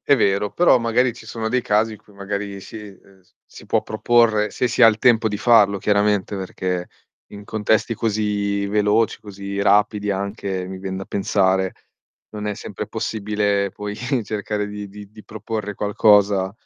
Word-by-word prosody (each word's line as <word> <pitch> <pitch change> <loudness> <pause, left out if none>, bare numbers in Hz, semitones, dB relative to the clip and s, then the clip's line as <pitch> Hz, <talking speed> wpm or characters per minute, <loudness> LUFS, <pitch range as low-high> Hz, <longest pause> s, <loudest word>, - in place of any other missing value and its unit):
È 140 - +4
vero, 100 -2 +1
però 175 -7 +4
magari 120 +2 +1
ci 120 - -14
sono 110 -1 -4
dei 125 +2 0
casi 110 +1 +1
in 110 - -10
cui 105 - -23
magari 100 0 -5
si 110 - -10
ehm, 100 -2 -14
s 90 - -33
si - - -15
può - - +1
proporre, 110 -1 +2
se 125 - -1
si 120 - 0
ha - - +10
il 110 -1 +1
tempo 115 -2 +4
di 105 - -3
farlo 105 -3 +4
chiaramente, 105 0 +1
perché 90 -1 -4 0.4
in 100 0 -10
contesti 110 +2 0
così 105 -2 -1
veloci, 105 +2 +1
così 100 -1 -6
rapidi 105 0 +2
anche, 100 -1 -3
mi 95 0 -7
vien 95 0 -5
da 95 - -5
pensare, 95 -1 +1 0.6
non 105 -1 -6
è 105 - -2
sempre - - -7
possibile 105 -2 -1
poi 105 +2 -6 0.3
cercare 105 0 -3
di 105 0 -7
di 100 0 -12
di 110 0 -15
proporre 105 -1 -5
qualcosa, 100 -2 +3
105 Hz, 175 wpm, -21 LUFS, 100-110 Hz, 0.6 s, ha